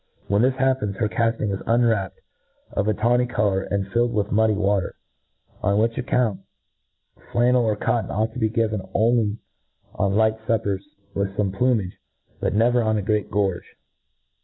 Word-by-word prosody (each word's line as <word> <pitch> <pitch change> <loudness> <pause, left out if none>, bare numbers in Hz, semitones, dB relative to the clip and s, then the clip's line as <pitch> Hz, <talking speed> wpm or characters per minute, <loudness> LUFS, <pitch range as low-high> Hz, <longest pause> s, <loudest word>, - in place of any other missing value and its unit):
When 100 +2 +2
this 130 +1 +3
happens, 130 -6 0
her 110 +1 0
cafting 115 -1 0
is 95 - -3
unwrapped, 115 -5 +1 0.5
of 100 - -1
a 110 - +3
tawny 120 +3 +2
colour, 105 -5 0
and 100 0 -2
filled 120 0 +2
with 105 0 -1
muddy 110 0 +3
water; 100 -2 0 0.7
on 100 +1 +1
which 115 +2 +1
account, 120 -5 0 0.9
flannel 120 +1 +3
or 105 - +1
cot 115 +1 -1
ton - - -7
ought 110 +2 -1
to 130 - -6
be 110 -2 +1
given 110 -2 0
only 110 -1 +2 0.6
on 100 -1 0
light 110 0 +2
fuppers, 100 -4 0 0.3
with 100 0 -2
fome 100 -2 0
plumage, 110 -5 0 0.4
but - - -1
never 120 +3 +3
on 110 -1 +1
a 105 - -2
great 105 0 0
gorge. 100 -4 -2
110 Hz, 165 wpm, -23 LUFS, 100-120 Hz, 0.9 s, this